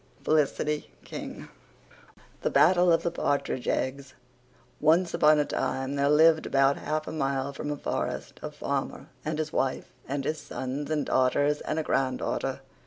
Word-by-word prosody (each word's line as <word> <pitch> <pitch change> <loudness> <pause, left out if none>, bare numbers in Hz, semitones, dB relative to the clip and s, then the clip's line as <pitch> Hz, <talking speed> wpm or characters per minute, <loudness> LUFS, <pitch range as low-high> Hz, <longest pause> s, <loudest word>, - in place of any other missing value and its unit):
FELICITY 150 0 +1 0.2
KING. - - -7 0.9
THE - - +1
BATTLE 175 +2 +5
OF 165 0 +3
THE 170 - 0
PARTRIDGE 140 -5 -1
EGGS 135 0 -2 0.7
Once 165 +3 +3
upon 150 0 +5
a 150 - +2
time 135 -1 -2
there 140 0 +1
lived 160 +1 +5
about 135 0 +3
half 155 +1 -3
a - - -4
mile 140 -2 -1
from 145 - -5
a 145 - -2
forrest - - -4
a - - -4
farmer - - -4
and 155 0 -2
his 155 0 -3
wife 130 -1 -1 0.2
and 140 0 -2
his 155 0 -1
sons 145 0 -5
and 155 -2 0
daughters 145 +3 +2
and 155 - -3
a 160 - 0
granddaughter. 130 -3 -1
150 Hz, 160 wpm, -27 LUFS, 135-155 Hz, 0.9 s, BATTLE